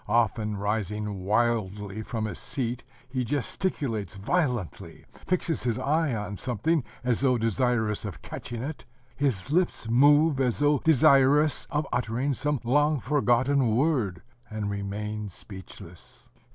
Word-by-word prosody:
Often, 110 Hz, -1 st, +1 dB
rising 105 Hz, 0 st, -2 dB
wildly 105 Hz, -2 st, 0 dB
from 110 Hz, 0 st, -3 dB
his 100 Hz, -6 st, -5 dB
seat, 125 Hz, -2 st, -3 dB, 0.2 s
he 130 Hz, 0 st, -2 dB
gesticulates 125 Hz, -, -2 dB
violently, 120 Hz, -, -2 dB, 0.2 s
fixes 170 Hz, -3 st, 0 dB
his 120 Hz, -2 st, -1 dB
eyes 145 Hz, +1 st, +1 dB
on 105 Hz, -1 st, -5 dB
something 130 Hz, -, 0 dB, 0.2 s
as 125 Hz, -2 st, +1 dB
though 130 Hz, -2 st, +3 dB
desirous 115 Hz, -1 st, 0 dB
of 95 Hz, -7 st, -7 dB
catching 120 Hz, 0 st, -6 dB
it: 145 Hz, +3 st, -6 dB, 0.3 s
his 135 Hz, -5 st, -1 dB
lips 175 Hz, -8 st, +1 dB
move 145 Hz, +3 st, +5 dB
as 125 Hz, -3 st, +1 dB
though 145 Hz, -1 st, +3 dB
desirous 145 Hz, 0 st, +4 dB
of 150 Hz, +1 st, -1 dB
uttering 125 Hz, +4 st, 0 dB
some 150 Hz, +1 st, -1 dB
long 145 Hz, +4 st, +2 dB
forgotten 125 Hz, -2 st, +2 dB
word 120 Hz, -, +1 dB, 0.3 s
and 105 Hz, -2 st, -3 dB
remain 105 Hz, +1 st, -4 dB
speechless. 90 Hz, -2 st, -12 dB
120 Hz, 125 wpm, -27 LUFS, 105-140 Hz, 0.3 s, move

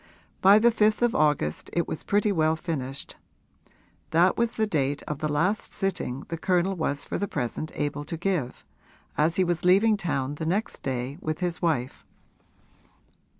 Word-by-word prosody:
By 195 Hz, +2 st, +8 dB
the 235 Hz, +2 st, +5 dB
fifth 215 Hz, +1 st, +2 dB
of 240 Hz, -, +3 dB
August 150 Hz, -, +1 dB
it 170 Hz, -, 0 dB
was -, -, -4 dB
pretty 205 Hz, +1 st, +1 dB
well 160 Hz, -3 st, +2 dB
finished: 140 Hz, -5 st, -5 dB, 0.9 s
that 170 Hz, +3 st, +4 dB
was 235 Hz, 0 st, 0 dB
the 220 Hz, -, +1 dB
date 145 Hz, -7 st, -1 dB
of 150 Hz, -2 st, -5 dB
the 155 Hz, -, -1 dB
last 185 Hz, +8 st, 0 dB
sitting 175 Hz, -9 st, -2 dB
the 165 Hz, -, -4 dB
Colonel 185 Hz, +2 st, +1 dB
was 145 Hz, -4 st, -1 dB
for -, -, -3 dB
the 200 Hz, -, -1 dB
present 145 Hz, 0 st, -3 dB
able 145 Hz, 0 st, -2 dB
to 165 Hz, -, -5 dB
give, 170 Hz, -8 st, -2 dB, 0.5 s
as 160 Hz, +2 st, +2 dB
he 190 Hz, -, +3 dB
was 175 Hz, 0 st, -1 dB
leaving 200 Hz, +4 st, +5 dB
town 145 Hz, -7 st, -2 dB
the -, -, -1 dB
next 200 Hz, +6 st, -1 dB
day 130 Hz, +3 st, -3 dB
with 155 Hz, 0 st, -2 dB
his 175 Hz, -1 st, -2 dB
wife. 145 Hz, -7 st, -1 dB
165 Hz, 170 wpm, -26 LUFS, 145-195 Hz, 0.9 s, By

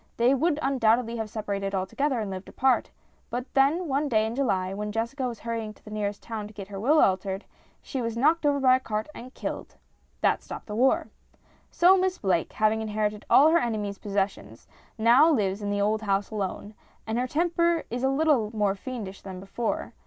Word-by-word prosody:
They 240 Hz, +3 st, +4 dB
would 295 Hz, +3 st, +1 dB
undoubtedly 235 Hz, -3 st, +2 dB
have 220 Hz, -1 st, -4 dB
separated 200 Hz, -2 st, -3 dB
alto 190 Hz, 0 st, -3 dB
gether 275 Hz, -3 st, +1 dB
and 210 Hz, -3 st, -3 dB
lived 185 Hz, 0 st, -7 dB
apart, 265 Hz, -1 st, +1 dB, 0.4 s
but 245 Hz, +1 st, -3 dB
one 285 Hz, +1 st, +2 dB
day 220 Hz, -3 st, +3 dB
in 220 Hz, -, -3 dB
July, 195 Hz, -8 st, 0 dB
when 210 Hz, +1 st, -4 dB
Jessica 235 Hz, +5 st, -2 dB
was 235 Hz, -3 st, -6 dB
hurrying 225 Hz, -2 st, -4 dB
to -, -, -25 dB
the 215 Hz, -, -10 dB
nearest 205 Hz, -1 st, -3 dB
town 220 Hz, -3 st, -5 dB
to 215 Hz, -, -15 dB
get 200 Hz, -1 st, -8 dB
her 195 Hz, -1 st, -6 dB
will 290 Hz, +9 st, +4 dB
altered, 190 Hz, -1 st, +1 dB, 0.4 s
she 265 Hz, -, -4 dB
was 230 Hz, -1 st, -3 dB
knocked 315 Hz, +7 st, +3 dB
over 285 Hz, -1 st, +2 dB
by 255 Hz, -1 st, +5 dB
a -, -, -8 dB
cart 215 Hz, -4 st, -3 dB
and 250 Hz, -1 st, -10 dB
killed. -, -, -6 dB, 0.5 s
That -, -, +2 dB
stopped -, -, -8 dB
the 210 Hz, -, -6 dB
war! 255 Hz, +4 st, +2 dB, 0.6 s
So 365 Hz, +2 st, +5 dB
Miss 370 Hz, 0 st, 0 dB
Blake, 180 Hz, -5 st, 0 dB
having 215 Hz, +1 st, +2 dB
inherited 210 Hz, -1 st, -2 dB
all 300 Hz, +3 st, +7 dB
her 335 Hz, +1 st, +4 dB
enemy's 210 Hz, -6 st, -3 dB
possessions, 195 Hz, -, -3 dB, 0.3 s
now 240 Hz, +8 st, +6 dB
lives 205 Hz, -7 st, 0 dB
in 205 Hz, -, -3 dB
the 205 Hz, 0 st, 0 dB
old 215 Hz, +2 st, +1 dB
house 200 Hz, -1 st, -1 dB
alone; 205 Hz, 0 st, -4 dB, 0.3 s
and 225 Hz, +2 st, -1 dB
her 250 Hz, -, 0 dB
temper 340 Hz, +2 st, +1 dB
is 245 Hz, +1 st, -3 dB
a 265 Hz, -, +2 dB
little 270 Hz, -6 st, +2 dB
more 205 Hz, -2 st, +2 dB
fiendish 200 Hz, -2 st, -7 dB
than 190 Hz, -2 st, -8 dB
before. 195 Hz, +5 st, -3 dB
225 Hz, 200 wpm, -26 LUFS, 205-265 Hz, 0.6 s, all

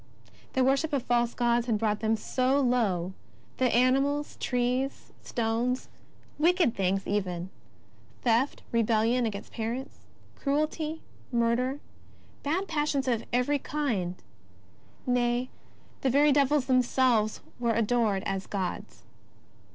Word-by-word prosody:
The 260 Hz, -, +3 dB
worship 275 Hz, +4 st, +2 dB
of 270 Hz, -4 st, +1 dB
false 240 Hz, -1 st, +1 dB
gods 240 Hz, 0 st, +1 dB
had 225 Hz, -3 st, +2 dB
brought 210 Hz, -1 st, 0 dB
them 220 Hz, 0 st, +1 dB
so 255 Hz, +5 st, +1 dB
low, 210 Hz, -9 st, +1 dB, 0.4 s
that 255 Hz, -2 st, +2 dB
animals, 275 Hz, +4 st, +2 dB
trees, 250 Hz, +2 st, -1 dB
stones, 235 Hz, +2 st, -1 dB, 0.5 s
wicked 340 Hz, -5 st, +3 dB
things 195 Hz, -1 st, 0 dB
even 185 Hz, -3 st, -2 dB, 0.3 s
— -, -, -30 dB
theft, 240 Hz, +3 st, +1 dB
rebellion 230 Hz, +1 st, +2 dB
against 200 Hz, -2 st, -6 dB
parents, 240 Hz, +5 st, -4 dB, 0.4 s
cruelty, 305 Hz, +2 st, -1 dB, 0.3 s
murder, 240 Hz, +3 st, +1 dB, 0.6 s
bad 350 Hz, +7 st, -1 dB
passions 295 Hz, -4 st, 0 dB
of 230 Hz, -2 st, 0 dB
every 250 Hz, +4 st, +2 dB
kind 230 Hz, -13 st, -2 dB, 0.5 s
— -, -, -31 dB
nay, 245 Hz, 0 st, +1 dB, 0.5 s
the 265 Hz, -, +2 dB
very 290 Hz, +3 st, +5 dB
devils 285 Hz, -1 st, +3 dB
themselves, 250 Hz, -4 st, +2 dB, 0.2 s
were 235 Hz, -2 st, +1 dB
adored 225 Hz, -3 st, +1 dB
as 195 Hz, -1 st, -2 dB
gods. 190 Hz, -3 st, -4 dB
245 Hz, 120 wpm, -28 LUFS, 225-275 Hz, 0.6 s, very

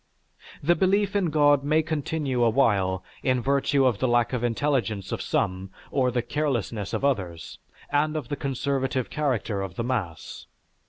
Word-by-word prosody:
The 170 Hz, +4 st, +4 dB
belief 200 Hz, +2 st, +2 dB
in 195 Hz, -3 st, +2 dB
God 145 Hz, -2 st, +4 dB
may 155 Hz, +2 st, +2 dB
continue 150 Hz, -4 st, -2 dB
awhile 100 Hz, -6 st, +2 dB, 0.2 s
in 130 Hz, -1 st, +1 dB
virtue 140 Hz, +2 st, +2 dB
of 120 Hz, -6 st, +2 dB
the 130 Hz, -, +1 dB
lack 120 Hz, 0 st, +2 dB
of 125 Hz, -1 st, -1 dB
intelligence 115 Hz, -5 st, -1 dB
of -, -, -2 dB
some, 95 Hz, +1 st, -1 dB, 0.2 s
of 125 Hz, -3 st, +1 dB
the 120 Hz, -, +1 dB
carelessness 120 Hz, -9 st, -2 dB
of -, -, -1 dB
others, 95 Hz, -12 st, -2 dB, 0.3 s
and 150 Hz, +2 st, +1 dB
of 140 Hz, -6 st, -5 dB
the 145 Hz, -, -1 dB
conservative 135 Hz, -1 st, -2 dB
character 120 Hz, -9 st, -1 dB
of 95 Hz, -2 st, -5 dB
the 115 Hz, -, -2 dB
mass. 110 Hz, -10 st, -4 dB
130 Hz, 160 wpm, -26 LUFS, 115-145 Hz, 0.3 s, The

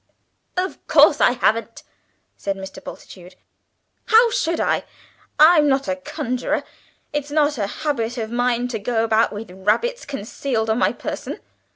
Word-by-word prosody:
"Of 370 Hz, +1 st, -3 dB
course -, -, +5 dB
I 245 Hz, -, +5 dB
haven't!" 230 Hz, -1 st, 0 dB, 0.5 s
said 195 Hz, -1 st, -3 dB
Mr. 190 Hz, 0 st, -9 dB
Bultitude. 180 Hz, -1 st, -11 dB, 0.7 s
"How 460 Hz, +1 st, +5 dB
should 340 Hz, -9 st, 0 dB
I? -, -, +1 dB, 0.5 s
I'm 310 Hz, -1 st, +7 dB
not 275 Hz, 0 st, +1 dB
a 280 Hz, -, 0 dB
conjurer. 275 Hz, -3 st, -3 dB, 0.5 s
It's 295 Hz, -1 st, -2 dB
not 295 Hz, -2 st, +1 dB
a 200 Hz, -, 0 dB
habit 245 Hz, -1 st, -3 dB
of 220 Hz, -1 st, -4 dB
mine 245 Hz, 0 st, 0 dB
to 225 Hz, -3 st, -3 dB
go 225 Hz, +1 st, 0 dB
about 225 Hz, 0 st, +2 dB
with 210 Hz, -2 st, -7 dB
rabbits 210 Hz, -, 0 dB
concealed 225 Hz, -2 st, -2 dB
on 220 Hz, -, +1 dB
my -, -, +3 dB
person. -, -, -6 dB
245 Hz, 150 wpm, -21 LUFS, 220-295 Hz, 0.7 s, I'm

